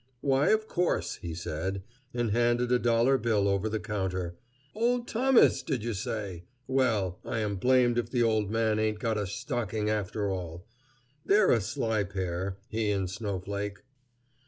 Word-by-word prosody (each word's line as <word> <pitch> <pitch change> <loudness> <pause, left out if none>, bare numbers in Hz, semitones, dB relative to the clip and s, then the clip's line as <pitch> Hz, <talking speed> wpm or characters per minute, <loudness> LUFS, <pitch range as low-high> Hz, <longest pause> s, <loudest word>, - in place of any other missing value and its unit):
"Why, 135 0 +3
of 215 0 +2
course," 180 -3 0
he 85 -2 -6
said, 95 +4 -3 0.3
and 120 -3 -1
handed 120 +2 +2
a 125 - +4
dollar 120 +3 +3
bill 105 -3 +1
over 100 +2 +1
the 110 0 -1
counter. 95 -4 -3 0.4
"Old 240 +2 +1
Thomas, 255 +2 +4
did 130 -8 -2
you 115 0 -2
say? 100 -3 -4 0.2
Well, 115 -9 +1
I 115 - -3
am 105 -2 -1
blamed 125 +2 +3
if 115 -1 -3
the 120 -2 +1
old 110 -3 +1
man 110 -1 +1
ain't 110 -1 0
got 110 0 -1
a 100 - -2
stocking 110 -1 -2
after 105 0 -1
all. 90 -2 -5 0.6
They're 200 +3 +4
a 115 - +4
sly 110 0 -1
pair, 95 0 -3
he 110 -3 -1
and 100 -2 0
Snowflake." 100 +1 -4
110 Hz, 160 wpm, -29 LUFS, 100-120 Hz, 0.6 s, a